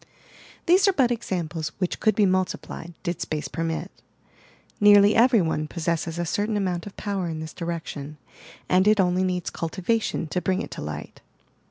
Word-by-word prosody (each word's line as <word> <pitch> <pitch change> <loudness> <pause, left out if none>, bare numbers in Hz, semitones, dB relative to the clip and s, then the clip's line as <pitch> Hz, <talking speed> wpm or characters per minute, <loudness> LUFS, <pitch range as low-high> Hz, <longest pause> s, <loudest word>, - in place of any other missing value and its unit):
These 375 +4 +5
are 390 - +4
but 255 -8 +3
examples 170 -8 -3
which 180 -2 -2
could 215 - +2
be 210 - +4
multiplied, 185 -2 -2
did 170 -1 -3
space 155 -2 -3
permit. 165 0 -3 0.9
Nearly 205 0 +7
every 235 -3 +5
one 155 -1 -1
possesses 165 0 -2
a 175 - -1
certain 205 +5 -1
amount 185 -2 -2
of 200 - -11
power 195 -4 -2
in 160 -1 -4
this 160 0 -7
direction, 160 -4 -5 0.5
and 185 +2 +3
it 215 -1 +5
only 180 0 +3
needs 180 -2 -1
cultivation 190 +3 -1
to 180 - -1
bring 185 0 0
it - - -9
to - - -6
light. 75 0 -7
180 Hz, 170 wpm, -25 LUFS, 165-205 Hz, 0.9 s, Nearly